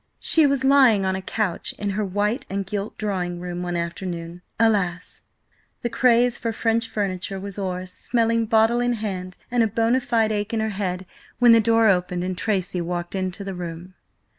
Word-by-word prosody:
She 320 Hz, -3 st, +5 dB
was 275 Hz, -1 st, 0 dB
lying 265 Hz, -7 st, +5 dB
on 190 Hz, 0 st, 0 dB
a 190 Hz, -, -4 dB
couch 195 Hz, -2 st, -2 dB
in 205 Hz, -1 st, -2 dB
her 210 Hz, +2 st, -1 dB
white 205 Hz, +6 st, -1 dB
and 195 Hz, 0 st, -2 dB
gilt 205 Hz, +2 st, -4 dB
drawing 180 Hz, -4 st, -2 dB
room 175 Hz, 0 st, -5 dB
one 175 Hz, -1 st, -3 dB
afternoon–alas! 175 Hz, +3 st, -2 dB, 0.6 s
the 240 Hz, -, -1 dB
craze 245 Hz, -1 st, +3 dB
for 230 Hz, -, -2 dB
French 225 Hz, +1 st, 0 dB
furniture 195 Hz, -1 st, -3 dB
was 200 Hz, +1 st, -7 dB
o'er–smelling 210 Hz, +5 st, -1 dB
bottle 225 Hz, +2 st, +3 dB
in 245 Hz, 0 st, +1 dB
hand 190 Hz, -5 st, -5 dB
and 245 Hz, -1 st, +2 dB
a 225 Hz, -, +4 dB
bona 230 Hz, +4 st, +1 dB
fide 230 Hz, -3 st, +1 dB
ache 210 Hz, +1 st, -2 dB
in -, -, 0 dB
her 220 Hz, 0 st, 0 dB
head, 190 Hz, -2 st, -3 dB, 0.3 s
when 245 Hz, -1 st, +6 dB
the 230 Hz, 0 st, +7 dB
door 225 Hz, 0 st, +4 dB
opened 180 Hz, -2 st, +1 dB
and 185 Hz, 0 st, -2 dB
Tracy 185 Hz, -3 st, -1 dB
walked 175 Hz, 0 st, -4 dB
into 190 Hz, +1 st, -3 dB
the 195 Hz, -1 st, -5 dB
room. 175 Hz, 0 st, -7 dB
200 Hz, 180 wpm, -23 LUFS, 180-230 Hz, 0.6 s, the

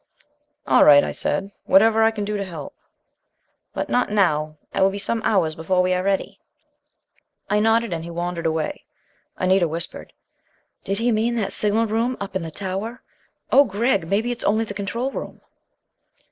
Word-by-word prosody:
"All 130 Hz, -2 st, +5 dB
right," 145 Hz, -1 st, +8 dB
I -, -, -2 dB
said. 195 Hz, +1 st, -2 dB
"Whatever 220 Hz, +3 st, +5 dB
I 225 Hz, -, +5 dB
can 215 Hz, -2 st, -4 dB
do 210 Hz, +1 st, -3 dB
to 200 Hz, -, -2 dB
help...." 165 Hz, -7 st, -8 dB, 1.0 s
"But -, -, -3 dB
not 245 Hz, -, +1 dB
now. 155 Hz, -7 st, +1 dB, 0.2 s
It -, -, -1 dB
will 190 Hz, -, +5 dB
be 195 Hz, -, -5 dB
some 225 Hz, +3 st, -2 dB
hours 185 Hz, -8 st, +2 dB
before 180 Hz, +3 st, 0 dB
we 185 Hz, 0 st, +1 dB
are 180 Hz, -, 0 dB
ready." 195 Hz, 0 st, -2 dB, 1.1 s
I 210 Hz, -, +3 dB
nodded, 225 Hz, -1 st, +2 dB
and 165 Hz, -1 st, -4 dB
he 170 Hz, -, -8 dB
wandered 170 Hz, 0 st, -3 dB
away. 160 Hz, -1 st, -3 dB, 0.5 s
Anita 185 Hz, -1 st, +2 dB
whispered: 165 Hz, +2 st, -6 dB, 0.7 s
"Did 195 Hz, -, -2 dB
he 235 Hz, +2 st, +1 dB
mean 230 Hz, +2 st, +1 dB
that 215 Hz, -4 st, -2 dB
signal 215 Hz, +2 st, +1 dB
room 230 Hz, +3 st, -1 dB
up 200 Hz, -1 st, -6 dB
in 190 Hz, -, 0 dB
the 165 Hz, -, -5 dB
tower? 195 Hz, +8 st, -5 dB, 0.5 s
Oh 280 Hz, -, +7 dB
Gregg, 205 Hz, -5 st, 0 dB
maybe 220 Hz, +5 st, 0 dB
it's 240 Hz, -, -5 dB
only 220 Hz, +2 st, +1 dB
the 205 Hz, -, -7 dB
control 210 Hz, +7 st, -3 dB
room." -, -, -7 dB
200 Hz, 175 wpm, -22 LUFS, 175-225 Hz, 1.1 s, right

